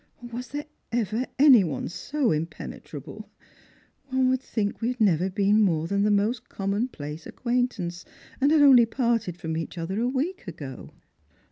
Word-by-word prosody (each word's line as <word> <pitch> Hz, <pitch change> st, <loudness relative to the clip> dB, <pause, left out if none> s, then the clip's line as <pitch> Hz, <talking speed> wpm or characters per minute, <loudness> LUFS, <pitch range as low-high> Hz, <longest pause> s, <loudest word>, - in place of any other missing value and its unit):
Was 250 Hz, +2 st, -5 dB
there 290 Hz, +1 st, -5 dB, 0.3 s
ever 230 Hz, +1 st, -1 dB
any 265 Hz, -6 st, +7 dB
one 150 Hz, -7 st, -3 dB
so 275 Hz, -, -1 dB
impenetrable? 160 Hz, +2 st, -6 dB, 0.8 s
One 260 Hz, -1 st, +2 dB
would 260 Hz, 0 st, 0 dB
think 210 Hz, -5 st, -3 dB
wa 230 Hz, -, 0 dB
had 250 Hz, 0 st, -2 dB
never 185 Hz, -4 st, +3 dB
been 205 Hz, +2 st, +3 dB
more 165 Hz, -6 st, +2 dB
than 200 Hz, +4 st, 0 dB
the 210 Hz, -, +3 dB
most 210 Hz, +3 st, 0 dB
commonplace 195 Hz, -, -3 dB
acquaintance» 235 Hz, -8 st, -2 dB, 0.4 s
and 280 Hz, -, +4 dB
had 310 Hz, -2 st, +5 dB
only 250 Hz, -5 st, +7 dB
parted 230 Hz, -7 st, 0 dB
from 160 Hz, -2 st, -4 dB
each 165 Hz, +2 st, -5 dB
other 180 Hz, +5 st, -3 dB
a 240 Hz, -, +1 dB
week 285 Hz, -, -2 dB
ago." 145 Hz, -6 st, -8 dB
215 Hz, 155 wpm, -26 LUFS, 175-255 Hz, 0.8 s, any